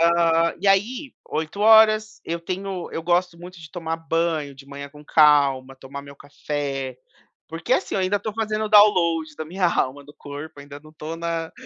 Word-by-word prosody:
Ah, 170 0 +3
e 200 - -2
aí, 235 +8 +1
8h 215 +5 +4
eu 170 +1 -3
tenho 185 +1 -5
eu 165 - -4
gosto 175 +1 +1
muito 175 0 -11
de 155 - -12
tomar 165 -2 -4
banho 165 -3 -1
de 135 +1 -15
manhã 140 0 -8
com 150 +1 -15
calma, 140 -4 +4
tomar 135 +1 -9
meu 140 0 -13
café, 140 -2 -4 0.5
porque, 165 +8 -3
assim, - - -2
eu - - +1
ainda 190 +2 +1
estou 215 +1 -4
fazendo 215 -1 -1
dowload 170 -7 +4
da 155 - -5
minha 180 +3 0
alma, 145 -4 -1
do 145 +1 -15
corpo, 145 +1 -9
ainda 145 0 -11
não 155 - -16
estou 155 +1 -7
na 165 -1 -3
165 Hz, 180 wpm, -23 LUFS, 145-185 Hz, 0.5 s, 8h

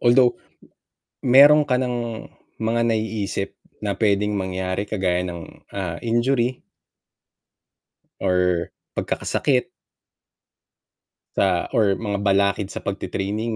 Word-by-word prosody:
although, 120 +1 +5 0.9
meron 145 +4 +7
ka 130 -3 +1
ng 120 -3 -3 0.3
mga 115 +1 0
naiisip 110 -4 -1 0.2
na 100 -1 -2
pwedeng 105 0 +1
mangyari 95 0 -2
kagaya 90 -3 0
ng, 85 -2 -9
ah, 90 -4 -4
injury 120 +2 +1 1.6
or 90 -2 +1 0.2
pagkakasakit 130 -3 0 1.7
sa 90 -3 +1
or 105 -6 +3
mga 105 -3 -3
balakid 100 0 +2
sa - - -7
pagtit-training 100 +3 -3
105 Hz, 95 wpm, -22 LUFS, 95-120 Hz, 1.7 s, meron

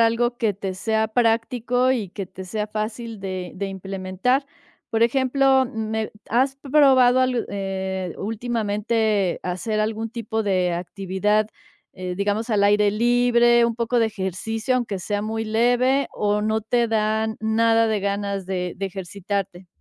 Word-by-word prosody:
algo 235 +1 +2
que 220 -3 +1
te 190 -1 -5
sea 220 +3 0
práctico 240 +2 +1
y 215 -7 -2
que 195 +1 -6
te 190 +1 -9
sea 210 +3 -3
fácil 215 +1 -5
de 185 -2 -5
de 200 +1 -3
implementar. 195 +7 -1 0.5
Por 225 0 +1
ejemplo, 265 +1 +3
mm, - - -7 0.2
me, 220 -1 -2 0.2
¿has 265 +3 +2
probado 265 -3 +4
al 255 -2 +1
eh, 190 -2 -3
últimamente 215 -2 0
hacer 185 +5 -2
algún 220 +1 -1
tipo 225 -2 -3
de 185 -3 +1
actividad, 195 +4 0 0.5
eh, 185 -1 -5
digamos 205 +4 -1
al 205 -2 +3
aire 205 0 +4
libre, 240 +1 +4
un 235 -1 0
poco 235 +1 +1
de 225 - +4
ejercicio, 220 +4 -2
aunque 225 -6 -1
sea 205 +3 -2
muy 220 +1 -2
leve 245 +5 +2
o 210 0 0
no 220 0 0
te 235 +1 +1
dan 220 0 0
nada 225 +1 +3
de 215 -2 0
ganas 200 0 -2
de 180 -1 -3
de 195 +1 -2
ejercitarte? 190 0 -5
220 Hz, 150 wpm, -23 LUFS, 195-235 Hz, 0.5 s, probado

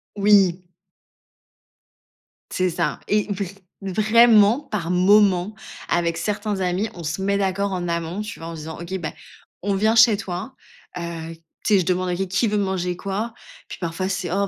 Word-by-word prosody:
Oui. 195 -3 +4 1.9
C'est 185 0 +1
ça, - - -1
et 210 -1 +1
vr 200 0 -2 0.4
vraiment, 215 +3 +5
par 210 - -4
moments, 190 +1 +4 0.3
avec 170 -1 0
certains 205 +3 -2
amis, 185 +4 0
on 170 - -8
se 160 +5 -3
met 200 +1 +1
d'accord 200 0 0
en 180 -2 -3
amont, 170 +2 -2
tu 210 +2 -7
vois? 165 - -7
En 165 - -6
disant: 160 0 -7
«OK, 175 +2 -7
bah, 155 -3 -4 0.5
on 200 +1 0
vient 215 +3 +2
chez 220 -2 +6
toi», 185 +6 -5 0.4
heu, 165 -1 -5 0.3
tu 210 - +3
sais, - - +5
je 180 - -1
demande 185 0 0
à 175 - 0
qué 195 - -2
«qui 195 +5 +1
veut 210 0 0
manger 185 -3 -1
quoi?» 205 +5 -3 0.4
Puis, - - -7
parfois, 175 +2 -3
c'est: 195 -2 -2
«Oh, 200 +1 +1
190 Hz, 175 wpm, -22 LUFS, 175-205 Hz, 1.9 s, chez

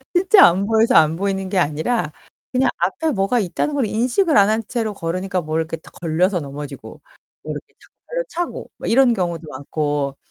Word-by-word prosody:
진짜 385 +3 +7
안 190 +3 +1
보여서 225 +1 +3
안 160 0 +5
보이는 195 0 -2
게 195 - -1
아니라 160 +3 0 0.4
그냥 260 +1 +2
앞에 195 - 0
뭐가 200 +3 +1
있다는 215 - -2
걸 265 -5 +1
인식을 250 - +1
안 200 +1 +6
한 220 +1 0
채로 225 -4 -2
걸으니까 185 +1 -3
뭘 155 +1 -2
이렇게 160 0 -4
딱 - - -17
걸려서 175 +3 +1
넘어지고 140 -1 -8 0.4
뭐 - - -5
이렇게 - - -7
탁 - - -21 0.2
발로 - - -2
차고 350 0 -5
뭐 - - -6
이런 245 0 +4
경우도 170 -5 -3
많고 145 0 -2
190 Hz, 375 characters per minute, -20 LUFS, 160-235 Hz, 0.4 s, 진짜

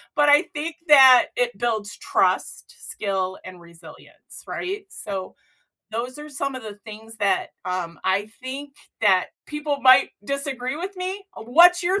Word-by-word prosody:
But 295 0 +3
I 290 +4 +6
think 310 +2 -4
that 260 -4 +8
it 245 -4 0
builds 220 -3 -2
trust, - - -1 0.2
skill, 190 -2 -3
and 185 -1 -10
resilience, 170 0 -14
right? 395 +2 -5
So 195 -3 -6 0.6
those 250 +5 -4
are 300 0 -9
some 275 -1 -4
of 255 - -8
the 210 -1 -7
things 220 +1 -11
that, 200 -2 0
um, 180 -2 -4
I 195 +2 +1 0.2
think 275 +2 -7 0.3
that 190 -4 +3 0.2
people 295 -1 -3
might 255 0 +6
disagree 275 0 -3
with 375 +3 -6
me. 380 +2 -5
Uh, - - -8
what's 345 +8 +6
your 375 +3 +1
255 Hz, 155 wpm, -23 LUFS, 205-295 Hz, 0.6 s, that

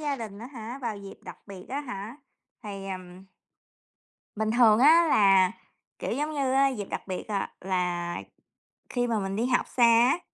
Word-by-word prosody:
gia 290 -2 -2
đình 215 -4 -8
á 235 - -8
hả? 245 -1 -8
Vào 225 -3 -3
dịp 200 -1 -10
đặc - - -10
biệt 190 -2 -10
á 275 +3 -3
hả? 230 -2 -7 0.5
Thì, 195 -2 -7
ừm 185 0 -8 1.1
bình 220 0 0
thường, 225 -2 +5
á 325 +5 +6
là, 195 -6 +5 0.5
kiểu, - - -3
giống 295 +5 -2
như 275 -3 0
á 275 +1 +4
dịp 215 -7 -4
đặc - - -4
biệt, 185 - -4
à, 200 -2 -2
là 180 -2 -2 0.7
khi 245 -1 -1
mà 225 -2 0
mình 195 0 -3
đi 230 +3 0
học 250 -1 +1
xa 240 - +5
á, 235 +7 +5
220 Hz, 185 wpm, -27 LUFS, 195-255 Hz, 1.1 s, á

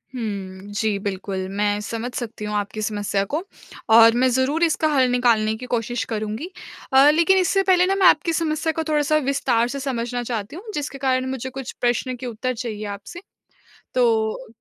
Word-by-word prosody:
हुँ, 200 -4 -5
जी 210 -1 0
बिल्कुल। 190 -1 -3
मैं 205 +1 0
समझ 230 +3 -4
सकती 225 -3 -5
हूँ 210 - -3
आपकी 205 +1 -3
समस्या 205 -1 -1
को 320 +4 0 0.5
और 230 0 +8
मैं 255 +1 +3
ज़रूर 265 +6 +1
इसका 315 -1 +2
हल 260 -2 +4
निकालने 230 -3 +2
की 250 +3 -8
कोशिश 240 +1 -2
करूँगी। 220 - -3 0.4
अ, 275 +2 +7
लेकिन 335 +5 +4
इससे 385 +1 +2
पहले 365 -2 +4
ना 390 +1 +1
मैं 385 -2 +5
आपकी 330 +2 +3
समस्या 320 0 0
को 320 - -2
थोड़ा-सा 305 0 +2
विस्तार 250 -4 +1
से 275 +2 -5
समझना 245 -2 -3
चाहती 225 +1 -4
हूँ 425 +5 -8
जिसके 290 -1 -4
कारण 260 -1 0
मुझे 260 0 -4
कुछ 260 -1 -7
प्रश्न 245 +1 0
के 255 - -8
उत्तर 245 +2 -3
चाहिए 220 -3 -5
आपसे। 345 - -11 0.7
तो 230 -1 +1
245 Hz, 180 wpm, -22 LUFS, 215-290 Hz, 0.7 s, और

